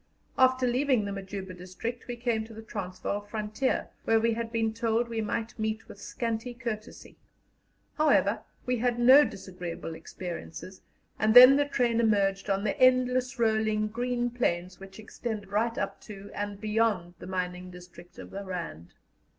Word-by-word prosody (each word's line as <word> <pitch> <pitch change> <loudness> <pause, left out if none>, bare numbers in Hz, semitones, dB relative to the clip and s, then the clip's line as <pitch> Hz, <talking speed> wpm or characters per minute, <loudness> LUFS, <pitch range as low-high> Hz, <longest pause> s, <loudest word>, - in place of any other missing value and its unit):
After 260 0 +4
leaving 250 -2 +2
the 200 - -3
Majuba 195 -1 -6
district, 185 +7 -6
we 245 - -4
came 235 -2 -1
to 225 0 -12
the 220 - -9
Transvaal 200 -1 -4
frontier, 215 +4 -2
where 225 0 +3
we 230 +1 +2
had 230 0 -4
been 225 -1 0
told 230 +1 0
we 230 -1 -2
might 225 +2 -3
meet 220 0 -2
with 200 - -12
scanty 235 0 -3
courtesy. 230 -4 -7 0.8
However, 310 - +3 0.2
we 250 0 0
had 240 +1 0
no 260 +5 +8
disagreeable 180 - -6
experiences, 175 +2 -8 0.4
and 215 +2 +2
then 255 +2 +11
the 290 +1 +3
train 245 -5 +1
emerged 200 -3 +2
on 195 0 +1
the 215 - 0
endless 255 0 +3
rolling 220 -2 +1
green 245 +1 -1
plains 185 -7 -1
which 195 0 -12
extend 220 0 -5
right 230 +4 0
up - - -3
to 200 -2 -10
and 205 -1 -4
beyond 210 -5 0
the - - -9
mining 180 -1 -3
district 180 -1 -14
of - - -10
the 200 +1 -6
Rand. 170 - -6
220 Hz, 160 wpm, -28 LUFS, 195-240 Hz, 0.8 s, then